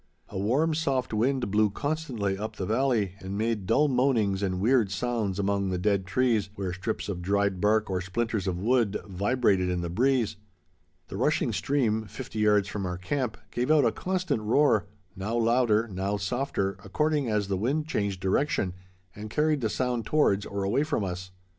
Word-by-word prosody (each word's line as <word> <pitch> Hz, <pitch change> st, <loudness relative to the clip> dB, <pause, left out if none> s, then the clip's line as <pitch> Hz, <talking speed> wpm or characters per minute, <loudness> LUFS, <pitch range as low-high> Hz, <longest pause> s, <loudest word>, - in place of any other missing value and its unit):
A -, -, -6 dB
warm, 135 Hz, +11 st, +2 dB
soft 135 Hz, -6 st, -1 dB
wind 120 Hz, 0 st, +1 dB
blew 105 Hz, +1 st, +3 dB
constantly 130 Hz, -6 st, -2 dB
up 105 Hz, +3 st, -5 dB
the 95 Hz, -, -3 dB
valley 110 Hz, -3 st, +1 dB
and 95 Hz, +1 st, -5 dB
made 110 Hz, -3 st, -1 dB
dull 150 Hz, +8 st, +4 dB
moanings 125 Hz, -7 st, +2 dB
and 95 Hz, -2 st, -1 dB
weird 115 Hz, 0 st, +3 dB
sounds 105 Hz, -1 st, -1 dB
among 100 Hz, -1 st, 0 dB
the 90 Hz, -, -1 dB
dead 100 Hz, 0 st, 0 dB
trees, 115 Hz, -1 st, +1 dB
where 95 Hz, -3 st, -3 dB
strips 95 Hz, +5 st, -3 dB
of 95 Hz, -4 st, -4 dB
dried 100 Hz, 0 st, 0 dB
bark 110 Hz, +1 st, +3 dB
or 95 Hz, -1 st, -1 dB
splinters 105 Hz, +2 st, -2 dB
of 90 Hz, -2 st, -1 dB
wood 115 Hz, +1 st, +2 dB
vibrated 100 Hz, -1 st, +1 dB
in 90 Hz, -1 st, -1 dB
the 85 Hz, -1 st, -4 dB
breeze. 120 Hz, +1 st, +1 dB, 0.7 s
The -, -, -5 dB
rushing -, -, +1 dB
stream, 115 Hz, -6 st, 0 dB
fifty 120 Hz, 0 st, -7 dB
yards 105 Hz, -2 st, +3 dB
from 100 Hz, -1 st, -3 dB
our 90 Hz, 0 st, -3 dB
camp, 115 Hz, +6 st, -2 dB
gave 125 Hz, +3 st, -1 dB
out 155 Hz, -4 st, +5 dB
a 115 Hz, -, +3 dB
constant 180 Hz, -8 st, -1 dB
roar, 110 Hz, +1 st, +3 dB, 0.3 s
now 105 Hz, +5 st, -2 dB
louder, 115 Hz, -1 st, +3 dB
now 100 Hz, 0 st, -2 dB
softer, 100 Hz, -3 st, -2 dB
according 150 Hz, +5 st, 0 dB
as 105 Hz, -2 st, 0 dB
the 100 Hz, -, 0 dB
wind 135 Hz, +11 st, 0 dB
changed 100 Hz, -, -2 dB
direction 95 Hz, -1 st, 0 dB, 0.4 s
and 105 Hz, +1 st, -7 dB
carried 150 Hz, +3 st, +1 dB
the 110 Hz, -, 0 dB
sound 125 Hz, -2 st, -1 dB
towards 105 Hz, -10 st, +2 dB
or 100 Hz, 0 st, -3 dB
away 100 Hz, +8 st, +1 dB
from 150 Hz, -8 st, -1 dB
us. 90 Hz, 0 st, -4 dB
105 Hz, 180 wpm, -27 LUFS, 95-125 Hz, 0.7 s, out